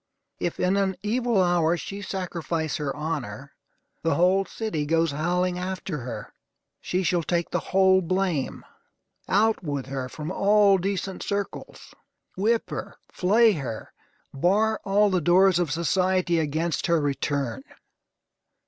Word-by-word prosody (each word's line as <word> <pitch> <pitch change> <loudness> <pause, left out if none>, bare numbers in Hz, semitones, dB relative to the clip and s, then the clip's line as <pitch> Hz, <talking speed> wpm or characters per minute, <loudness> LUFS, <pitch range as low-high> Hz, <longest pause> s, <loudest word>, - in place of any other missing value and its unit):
If, 175 - -3
in 185 +2 +2
an 195 -1 +1
evil 235 0 +1
hour, 175 -1 +2
she 200 +4 -6
sacrifice 170 -5 -3
her 145 -2 -3
honor, 140 -5 -5 0.5
the 165 - +1
whole 185 +3 +3
city 165 -11 -3
goes 165 0 +2
howling 180 +4 0
after 185 -3 -4
her. 115 -4 -7 0.5
She 185 +1 -1
shall 175 +1 +1
take 170 +1 -1
the - - +1
whole 190 0 +4
blame. 185 -5 -1 0.6
Out 215 +1 +2
with 145 -4 -3
her 130 -1 -4
from 155 +5 -6
all 200 0 +4
decent 195 0 -3
circles! 200 0 -5 0.4
Whip 225 +4 0
her. - - -5 0.2
Flay 220 +5 +4
her. 135 - -5 0.4
Bar 210 +9 +1
all 205 +1 +3
the 185 -2 +1
doors 180 +3 +4
of 175 -3 0
society 175 +2 +1
against 160 +3 -1
her 170 -1 +3
return. 140 - -2
180 Hz, 135 wpm, -25 LUFS, 155-195 Hz, 0.6 s, whole